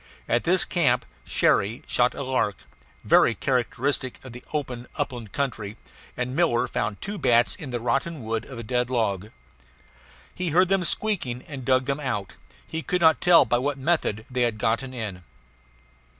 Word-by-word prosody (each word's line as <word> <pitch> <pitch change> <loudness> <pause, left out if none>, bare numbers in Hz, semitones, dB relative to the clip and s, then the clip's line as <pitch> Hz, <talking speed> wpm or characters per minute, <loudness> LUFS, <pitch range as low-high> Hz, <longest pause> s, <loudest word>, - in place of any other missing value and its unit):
At 120 - +1
this 180 +1 +4
camp 130 -8 +1 0.2
Cherrie 105 +4 +2
shot 125 0 +2
a - - -4
lark, 130 -7 0 0.5
very - - +5
characteristic 130 +1 0
of 130 - -9
the 125 - -10
open 125 -5 -4
upland 120 -6 -4
country, 110 -6 -3 0.4
and 125 +1 -2
Miller 165 -8 +2
found 105 -3 -2
two 205 0 -4
bats 120 0 +4
in 150 - -8
the 120 -1 -2
rotten 135 +5 -1
wood 110 0 -2
of 130 - -10
a 115 - -6
dead 125 +2 0
log. 110 -5 -1 1.0
He 180 -1 -2
heard 180 +4 +4
them 195 -2 +2
squeaking 165 - -1
and 140 -3 -7
dug 130 0 +2
them 140 +1 -1
out; 105 -9 -3 0.3
he 160 - -4
could 180 +5 -1
not 160 -1 +5
tell 175 -5 +7
by 120 +1 +1
what 140 +2 -1
method 135 -7 0
they 125 -1 -2
had 120 -3 +1
gotten 115 +5 0
in. 105 -7 -5
125 Hz, 170 wpm, -25 LUFS, 115-145 Hz, 1.0 s, tell